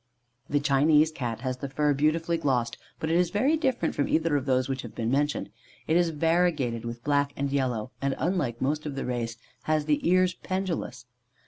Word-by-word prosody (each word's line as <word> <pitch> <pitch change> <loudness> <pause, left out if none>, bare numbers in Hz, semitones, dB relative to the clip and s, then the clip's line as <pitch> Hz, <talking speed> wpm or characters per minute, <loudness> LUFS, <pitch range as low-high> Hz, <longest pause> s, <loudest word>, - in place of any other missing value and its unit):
The 145 - +2
Chinese 150 +2 +4
Cat 120 -7 -4
has 130 -1 -2
the 140 +1 -5
fur 145 +2 +1
beautifully 160 +4 +1
glossed, 125 -6 0 0.2
but 160 - -2
it - - +2
is 180 -1 +2
very 260 - +2
different 265 - 0
from 145 - 0
either 160 -1 +1
of 140 -1 -1
those 130 -1 +2
which 135 -1 -2
have 115 - -10
been 115 +1 -1
mentioned. 145 +2 0 0.3
It 160 - +1
is 175 -1 +4
variegated 160 -7 +1
with 120 0 -6
black 145 -1 +1
and 140 0 -2
yellow, 125 -4 -1
and, 140 -1 0
unlike 150 -10 -1
most 150 +3 -1
of 145 - -5
the 135 - -3
race, 120 -2 -3 0.3
has 155 -1 +1
the 150 -1 +2
ears 185 0 +4
pendulous. 185 -10 -4
145 Hz, 200 wpm, -27 LUFS, 130-165 Hz, 0.3 s, Chinese